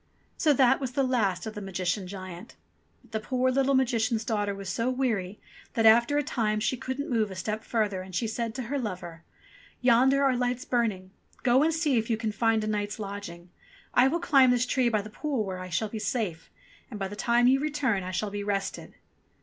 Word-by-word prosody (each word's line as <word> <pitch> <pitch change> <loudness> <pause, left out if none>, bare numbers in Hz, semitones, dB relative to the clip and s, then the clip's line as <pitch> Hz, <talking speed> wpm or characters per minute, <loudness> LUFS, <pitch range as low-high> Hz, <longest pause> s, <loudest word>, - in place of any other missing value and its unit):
So 310 - +3
that 265 -1 +4
was 260 -3 -4
the 275 - +1
last 230 -8 0
of 220 - -5
the 210 - -7
Magician 185 0 -2
giant. 185 +2 -9 0.5
But - - -23
the 220 - -1
poor 255 +3 0
little 275 +1 +2
Magician's 235 -3 +1
daughter 205 -3 -1
was 195 -1 -8
so 230 +7 -1
weary 220 -7 -1 0.4
that, 225 - +2
after 235 +6 +6
a 295 - +2
time, 220 -7 0
she 230 +4 0
couldn't 260 +3 -4
move 225 -4 +1
a 190 - -8
step 215 +4 -3
further, 210 -5 -1
and 185 -1 -9
she 235 - 0
said 225 0 -3
to 260 - -3
her 280 +5 -2
lover, 175 -7 -6 0.6
''Yonder 260 +3 +4
are 265 -2 +3
lights 245 0 -1
burning. 210 -7 -1 0.3
Go 255 +1 +4
and 320 +2 +3
see 310 -6 +1
if 225 - -4
you 225 - +1
can 220 -1 -2
find 225 +1 +1
a - - -2
night's 205 -1 -2
lodging: 195 -4 -7 0.4
I 250 - +5
will 330 +6 0
climb 275 -6 +5
this 245 0 +3
tree 250 -1 +2
by 215 -3 0
the 215 - -10
pool 270 -2 -2
where 185 -1 -5
I 185 0 -7
shall 195 +5 -1
be 220 - -5
safe, 205 -8 -3 0.4
and 210 - -7
by 195 - -2
the 205 - -8
time 235 +4 +2
you 265 +2 +5
return 280 -8 0
I 180 - -5
shall 200 +3 -2
be 205 0 -4
rested." 200 -1 -3
225 Hz, 220 wpm, -27 LUFS, 200-255 Hz, 0.6 s, after